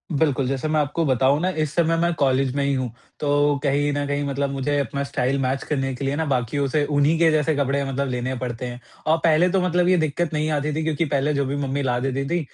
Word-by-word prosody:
बिल्कुल, 140 -3 +1
जैसे 135 +3 -2
मैं 155 0 +1
आपको 150 +3 0
बताऊँ 135 +2 +3
ना 185 - +1
इस 155 0 -2
समय 165 -1 +2
मैं 170 0 +2
कॉलेज 135 -1 +2
में 140 - +1
ही 140 0 +1
हूँ, 130 -3 -2 0.3
तो 145 0 +2
कहीं 145 +1 +1
न 145 0 -1
कहीं 145 0 -1
मतलब 140 0 -1
मुझे 140 +1 -1
अपना 140 +1 -2
स्टाइल 140 -1 -1
मैच 130 +1 -1
करने 135 -3 -2
के 135 +2 -5
लिए 140 +1 0
ना 160 +1 -1
बाकियों 135 +1 0
से 145 +2 +1
उन्हीं 145 +2 +2
के 165 -1 +5
जैसे 155 0 +1
कपड़े 140 0 0
मतलब 135 +1 -2
लेने 125 +1 -2
पड़ते 125 -1 -4
हैं। 120 0 -6 0.3
अ, 160 - +5
पहले 165 +2 +4
तो 190 - +2
मतलब 180 0 +1
ये 185 - +4
दिक्कत 160 +1 -1
नहीं 155 +1 0
आती 150 0 -1
थी 160 - -1
क्योंकि 160 +1 0
पहले 145 +1 0
जो 140 -1 0
भी 140 +2 -2
मम्मी 140 +2 -2
ला 125 -2 0
देती 135 +1 -2
थी 175 0 +1
140 Hz, 255 wpm, -23 LUFS, 135-155 Hz, 0.3 s, के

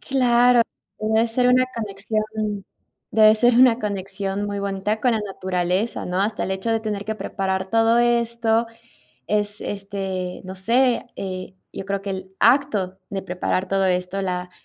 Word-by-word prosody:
Claro, 245 -2 +4 0.4
debe 220 +2 +2
ser 245 +2 +2
una 255 +1 +5
conexión 215 0 -3 0.9
debe 215 0 +6
ser 240 +2 +5
una 245 -1 +6
conexión 195 -1 -3
muy 205 0 -3
bonita 200 +2 -2
con 250 -2 +2
la 220 - 0
naturaleza, 190 +1 -2
¿no?, 180 +1 -1
hasta 215 +2 -1
el - - -2
hecho 190 +4 -2
de 225 -1 +1
tener 210 -2 -4
que 220 +1 -3
preparar 190 -3 -3
todo 225 +1 +4
esto 235 -1 +2 0.6
es, 210 0 +1
este, 195 -2 -4
no 190 +1 -7
sé, 240 +6 +2
eh, 185 -1 -6 0.2
yo - - -6
creo 200 0 -2
que 200 - -4
el 190 0 -6
acto 210 -10 +2
de 195 -1 -3
preparar 185 0 -2
todo 195 0 +1
esto, 180 +1 -1
la 180 -1 -3
205 Hz, 160 wpm, -22 LUFS, 190-230 Hz, 0.9 s, debe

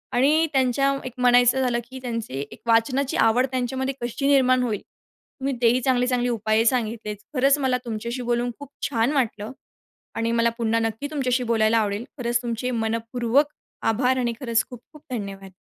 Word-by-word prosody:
आणि 295 +6 +4
त्यांच्या 270 +1 +2
एक 255 - -6
म्हणायचं 245 +1 +4
झालं 245 -2 +1
की, 260 0 -8
त्यांचे 230 - -4
एक - - -13
वाचनाची 255 +6 +2
आवड 235 +1 +4
त्यांच्यामध्ये 260 +1 -2
कशी 240 +3 -2
निर्माण 255 -2 +4
होईल, 220 -5 -2 0.6
तुम्ही 270 0 -1
तेही 240 +2 +4
चांगले-चांगले 250 -1 +1
उपाय 220 -1 +1
सांगितलेत. 225 -3 0 0.2
खरंच 275 +1 +4
मला 260 -2 +1
तुमच्याशी 235 +2 -4
बोलून 240 0 0
खूप 285 -2 -9 0.2
छान 235 -1 +1
वाटलं 225 -5 -1 0.6
आणि 230 0 0
मला 235 0 +3
पुन्हा 230 -1 +1
नक्की 225 +5 -2
तुमच्याशी 255 -4 0
बोलायला 225 -1 +2
आवडेल. 210 +1 -1
खरंच 240 -2 0
तुमचे 240 +1 -3
मनःपूर्वक 230 +4 0 0.4
आभार 250 +3 +1
आणि 240 -2 0
खरंच 235 -4 +1
खूप-खूप 255 +5 -13
धन्यवाद. 195 -4 -6
245 Hz, 155 wpm, -24 LUFS, 230-260 Hz, 0.6 s, आणि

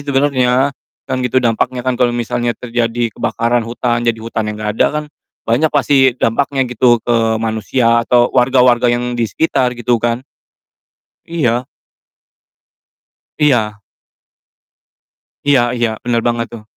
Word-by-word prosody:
sebenarnya, 135 -1 +1 0.3
kan 130 -1 -3
gitu 125 0 -2
dampaknya 120 +2 0
kan, 130 - +1
kalau 125 - +4
misalnya 120 0 -2
terjadi 120 -1 -2
kebakaran 120 +3 0
hutan, 120 0 -1
jadi 115 -1 0
hutannya 110 -1 -4
enggak 105 0 -3
ada - - +6
kan - - -8 0.4
banyak 125 +8 +2
pasti 135 -3 +3
dampaknya 135 +3 0
gitu 125 0 +3
ke 115 -2 +1
manusia, 115 +2 +1
atau 120 +1 +2
warga-warga 125 -1 +3
yang 120 +1 -1
di 120 -2 -1
sekitar, 125 -2 0
gitu, 120 -1 0
kan? 120 +2 -1 1.0
Iya. 125 -7 -1 1.7
Iya. 110 -8 +1 1.7
Iya 140 -3 +5 0.2
iya, 120 -1 +1 0.2
benar 120 -1 +1
banget 120 0 -1
tuh. 115 -2 -9
120 Hz, 125 wpm, -16 LUFS, 115-130 Hz, 1.7 s, ada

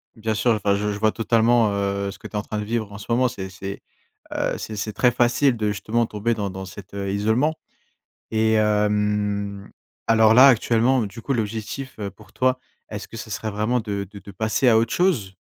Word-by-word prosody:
Bien 110 0 -2
sûr, 120 +3 +2
enfin 105 -2 +2
je 105 +1 -1
je 100 - -4
vois 110 0 +3
totalement, 115 -1 +3
heu, 100 0 -1
ce - - -12
que - - -9
tu - - -22
es - - -5
en - - 0
train 105 - -5
de - - -3
vivre 110 -2 -2
en 100 - -8
ce 100 - -10
moment, 125 +2 +3
c'est 95 -4 -6
c'est, 95 +1 -7 0.5
heu, - - -1
c'est 110 - -6
c'est 105 +1 -3
très 125 +4 +3
facile 120 +2 +2
de 105 -2 -1
justement 110 +3 0
tomber 110 +3 -1
dans 100 -3 -3
dans 95 +1 -7
cet 95 +1 -11
isolement 105 +9 0 0.8
et 110 0 +2
hem, 105 -1 0 0.4
alors 110 0 +5
là 130 +3 +9
actuellement 120 +1 +3
du 110 +4 -10
coup 135 - -1
l'objectif, 115 +3 -3
heu, 100 -1 -3
pour 105 +2 -19
toi 130 0 +1 0.3
est-ce 105 0 -6
que 115 - -10
ce 110 - -8
serait 110 +3 -3
vraiment 110 +4 0
de 100 -2 -3
de 100 - -10
de 100 - -12
passer 110 +5 +1
à 110 - +6
autre 115 0 0
chose? 125 - +1
110 Hz, 215 wpm, -23 LUFS, 100-115 Hz, 0.8 s, là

